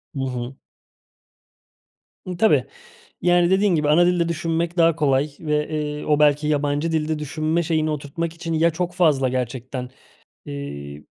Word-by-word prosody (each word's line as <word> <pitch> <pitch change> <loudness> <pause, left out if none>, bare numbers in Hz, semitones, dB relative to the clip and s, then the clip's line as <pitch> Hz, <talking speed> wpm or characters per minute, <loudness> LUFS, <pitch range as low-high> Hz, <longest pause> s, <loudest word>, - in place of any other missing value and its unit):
Hı - - -4
hı. 125 0 -5 1.7
Imm, 180 -1 -5
tabii, 150 - +4 0.6
yani, 175 0 +3
dediğin 190 -1 +3
gibi 150 -2 +1
ana 170 +4 +5
dilde 175 -1 +1
düşünmek 170 +1 -2
daha 165 -1 +4
kolay 145 -2 +1
ve, 150 -1 -1
eee, 150 -1 -3
o 150 -1 +2
belki 150 0 +3
yabancı 145 +2 0
dilde 155 -1 -1
düşünme 155 +3 -1
şeyini 160 -1 0
oturtmak 155 +3 -3
için 165 0 -5
ya 165 +1 +3
çok 175 +2 -3
fazla, 150 -8 +3
gerçekten, 125 0 -4 0.6
eee, 70 +1 -7
155 Hz, 145 wpm, -22 LUFS, 140-170 Hz, 1.7 s, ana